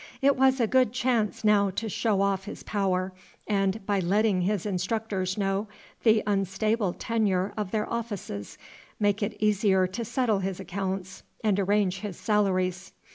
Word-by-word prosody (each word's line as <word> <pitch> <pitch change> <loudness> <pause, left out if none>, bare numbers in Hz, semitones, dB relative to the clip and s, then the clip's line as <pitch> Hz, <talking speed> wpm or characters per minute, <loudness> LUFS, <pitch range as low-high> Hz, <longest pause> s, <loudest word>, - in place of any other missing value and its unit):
It 280 +1 +4
was 265 0 +3
a 235 - +4
good 255 0 +3
chance 240 -5 0
now 205 -2 +4
to 225 - -2
show 210 -1 0
off 195 -1 0
his 210 - -8
power, 190 -2 -1 0.3
and, 195 0 0
by 200 -1 +1
letting 195 +1 +2
his 200 +1 0
instructors 190 0 -2
know 195 +1 0 0.3
the 220 -2 +4
unstable 200 0 0
tenure 205 -4 0
of 210 -3 -3
their 210 +1 -1
offices, 205 - -5 0.4
make 205 0 +1
it 210 +1 -2
easier 205 -3 +3
to 190 +6 -4
settle 230 -2 +1
his 190 -1 -3
accounts 190 0 -4 0.2
and 205 -3 +2
arrange 195 -1 +1
his 205 -4 -6
salaries. 190 -3 0
205 Hz, 155 wpm, -27 LUFS, 190-215 Hz, 0.4 s, It